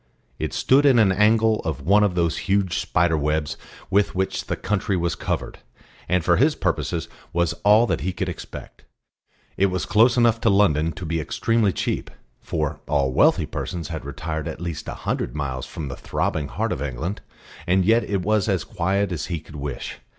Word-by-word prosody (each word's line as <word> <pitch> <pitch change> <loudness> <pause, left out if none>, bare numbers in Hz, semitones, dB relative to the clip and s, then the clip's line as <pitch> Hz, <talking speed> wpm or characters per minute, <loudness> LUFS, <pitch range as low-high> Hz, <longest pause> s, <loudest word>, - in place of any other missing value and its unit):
It - - -2
stood 135 +2 +3
in 130 -3 +5
an 105 -4 +5
angle 110 +2 +3
of 80 -3 -3
one 100 +8 +4
of 100 -4 +1
those 85 -2 +1
huge 100 -2 +2
spider 80 0 +1
webs 75 0 -1 0.4
with 100 0 +2
which 95 +1 -2
the - - -1
country 100 0 -1
was 85 -1 0
covered, - - -4 0.5
and 90 -2 +1
for 85 - +4
his 145 +4 +3
purposes 80 -2 -1 0.3
was 85 -1 +1
all 105 +3 +6
that - - -1
he 95 - -1
could 95 +1 -3
expect. 90 - -8 0.7
It 100 - +4
was 90 -1 -2
close 115 +4 +4
enough 115 -1 +3
to 115 - +3
London 85 -6 +3
to 90 - -7
be 80 +1 -1
extremely 115 +6 +1
cheap, - - -2 0.3
for - - -3
all 70 -3 +1
wealthy - - +4
persons 85 -4 -5
had 80 -2 -5
retired 75 +3 -4
at - - -6
least 85 -3 -5
a - - -4
hundred - - -2
miles 65 -4 -3
from 80 -3 -6
the 60 - -5
throbbing 75 -3 -2
heart - - -2
of - - -3
England; 75 +8 -4 0.5
and 95 +1 +3
yet 115 +3 +4
it 100 -3 -2
was 105 +1 +1
as 95 -3 +1
quiet 100 0 -1
as 85 -4 -3
he 85 -3 -3
could 80 0 -14
wish. 70 -3 -5
90 Hz, 195 wpm, -23 LUFS, 80-105 Hz, 0.7 s, all